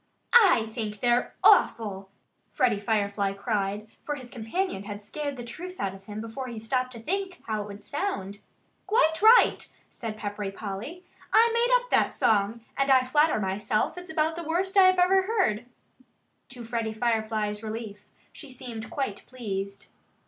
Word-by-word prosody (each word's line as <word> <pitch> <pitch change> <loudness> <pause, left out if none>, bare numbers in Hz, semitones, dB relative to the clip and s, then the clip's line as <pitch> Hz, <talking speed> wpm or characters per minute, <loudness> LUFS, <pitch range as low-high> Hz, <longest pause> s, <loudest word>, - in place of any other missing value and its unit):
"I 380 - +6
think 215 -3 -4
they're 245 +1 +1
awful!" 195 -4 +4 0.4
Freddie 235 -5 +1
Firefly 200 -2 0
cried; 205 0 -2 0.2
for 295 - -3
his 255 -3 -10
companion 230 - -3
had 205 0 -7
scared 285 +5 -5
the 240 - -6
truth 355 +10 -8
out 195 -1 -2
of 195 0 -14
him 210 +1 -6
before 230 +4 -6
he 235 -2 -7
stopped 255 +3 -1
to 230 - -9
think 375 - -3
how 215 -1 -2
it 205 - -6
would 205 0 -11
sound. 205 - -3 0.5
"Quite 380 -7 +3
right!" 455 +3 +6 0.2
said 220 -2 -6
Peppery 205 -1 -4
Polly. 215 - -7 0.3
"I 460 +1 +5
made 480 +2 +3
up - - -15
that - - +2
song. 225 -2 +2
And 275 0 +1
I 260 -1 +5
flatter 295 +1 +3
myself 205 +2 -1
it's 360 0 -9
about 320 0 0
the 340 - -5
worst 355 +5 -1
I 385 -2 +8
ever 370 +1 +4
heard." 375 - 0 0.8
To 245 -2 -9
Freddie 225 -1 -2
Firefly's 220 -2 -1
relief, 215 -2 -6 0.3
she 290 - -10
seemed 235 -3 -7
quite 265 -8 -3
pleased. 200 -5 -5
235 Hz, 165 wpm, -27 LUFS, 210-320 Hz, 0.8 s, I